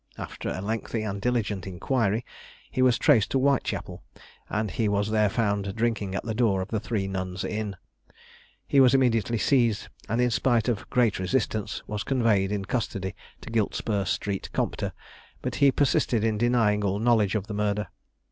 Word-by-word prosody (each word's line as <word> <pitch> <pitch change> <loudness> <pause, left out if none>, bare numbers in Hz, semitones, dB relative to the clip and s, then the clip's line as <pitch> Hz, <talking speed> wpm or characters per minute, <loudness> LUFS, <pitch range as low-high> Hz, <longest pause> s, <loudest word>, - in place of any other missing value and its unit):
After - - -5
a 95 - -3
lengthy 110 +2 -2
and 100 -2 -4
diligent 105 -5 -1
inquiry, 110 +4 0 0.5
he 130 - -1
was 125 -2 +4
traced 120 -9 +4
to - - +1
Whitechapel, 135 0 0 0.5
and 110 -2 -1
he 110 +5 0
was 100 +1 0
there 105 -1 +3
found 100 -2 -1
drinking 110 -4 -1
at - - -2
the 115 - -3
door 110 -4 +2
of 95 - -10
the 110 - -1
Three 105 -3 -2
Nuns 95 -1 -4
Inn. 105 -2 -3 0.9
He 140 - +3
was 130 0 +6
immediately 115 -3 +2
seized, 115 -3 +2 0.2
and 115 +3 0
in 125 0 +3
spite 120 0 +2
of 105 -6 -2
great 120 -6 +2
resistance 105 +1 -1
was 105 -1 -4
conveyed 110 -7 +2
in 100 -2 -2
custody 100 -3 -2 0.3
to - - -9
Giltspur 105 -2 0
street 100 +2 -2
Compter; - - -1 0.5
but 125 - -2
he 140 -1 +7
persisted 125 -4 +2
in 110 -2 +1
denying 115 -3 +2
all 100 0 0
knowledge 110 -2 +2
of 100 -2 -1
the 105 - -6
murder. 105 0 -1
110 Hz, 175 wpm, -26 LUFS, 100-120 Hz, 0.9 s, he